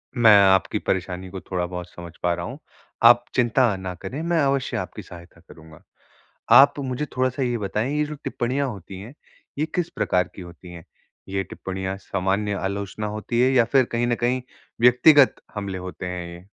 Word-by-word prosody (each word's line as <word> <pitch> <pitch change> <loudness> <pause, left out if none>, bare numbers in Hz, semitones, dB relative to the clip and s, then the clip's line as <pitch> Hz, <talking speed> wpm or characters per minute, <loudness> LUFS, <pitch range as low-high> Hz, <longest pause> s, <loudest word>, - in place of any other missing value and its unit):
मैं 115 -3 +7
आपकी 95 -1 +2
परेशानी 95 0 -3
को 95 0 -7
थोड़ा-बहुत 90 -1 -4
समझ 85 -1 -10
पा 90 -1 +2
रहा 85 0 -4
हूँ। 130 +5 -8 0.4
आप 120 +1 +7
चिंता 120 -2 +2
ना 95 -1 -5
करें, 140 - -6
मैं 170 0 0
अवश्य 135 -1 0
आपकी - - -6
सहायता 85 -1 -14
करूँगा। 80 -1 -15 0.8
आप 140 +1 +7
मुझे 135 +2 -3
थोड़ा-सा 130 +1 0
ये 120 -2 0
बताएँ, 105 +6 -2
ये 150 - +2
जो 150 0 -6
टिप्पणियाँ 135 +3 -1
होती 95 -3 -9
हैं, 115 +8 -11 0.4
ये 155 - 0
किस 175 -2 0
प्रकार 90 0 +1
की 95 - -9
होती 85 +1 -12
हैं? 85 -2 -11 0.4
ये 95 0 -1
टिप्पणियाँ 95 +1 -5
सामान्य 100 +2 -2
आलोचना 100 +2 -4
होती 110 +3 -2
है 130 +1 +4
या 125 -3 +5
फिर 135 -2 +5
कहीं 120 +1 0
न 120 - +1
कहीं 125 +1 0 0.4
व्यक्तिगत 125 +4 +6 0.2
हमले 100 -2 -4
होते 90 0 -7
हैं, 90 -1 -5
ये? 85 - -13
105 Hz, 180 wpm, -23 LUFS, 90-125 Hz, 0.8 s, मैं